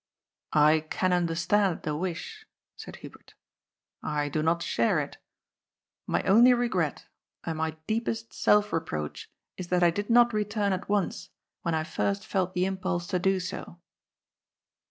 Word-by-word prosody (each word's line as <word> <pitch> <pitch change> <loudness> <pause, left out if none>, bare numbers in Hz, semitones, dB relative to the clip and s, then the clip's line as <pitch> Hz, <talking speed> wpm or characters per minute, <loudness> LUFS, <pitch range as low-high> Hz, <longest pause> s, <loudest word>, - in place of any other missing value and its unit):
I 155 +1 +6
can 185 -1 +1
understand 175 +2 +1
the 150 -2 -2
wish," 185 - -5 0.3
said - - -9
Hubert. - - -15 0.7
"I 150 -1 -1
do 155 +2 -1
not 170 +2 +1
share 115 - +1
it. - - -5 0.9
My - - 0
only 235 +6 +6
regret, 190 - -1 0.4
and 160 -2 -4
my 160 0 -2
deepest 225 +1 -2
self 210 -1 +3
reproach, 75 - -4 0.3
is 185 - -6
that 180 0 +2
I 170 - +5
did 205 +5 -4
not 240 0 +5
return 210 -1 0
at 185 +2 -5
once, 205 -2 -1 0.3
when 170 -1 -1
I 155 - 0
first 200 +5 -2
felt 185 -3 -1
the 180 +1 +2
im 190 0 -2
pulse 185 -2 -2
to 180 - 0
do 190 +1 +2
so. 180 -1 -6
185 Hz, 155 wpm, -28 LUFS, 165-205 Hz, 0.9 s, I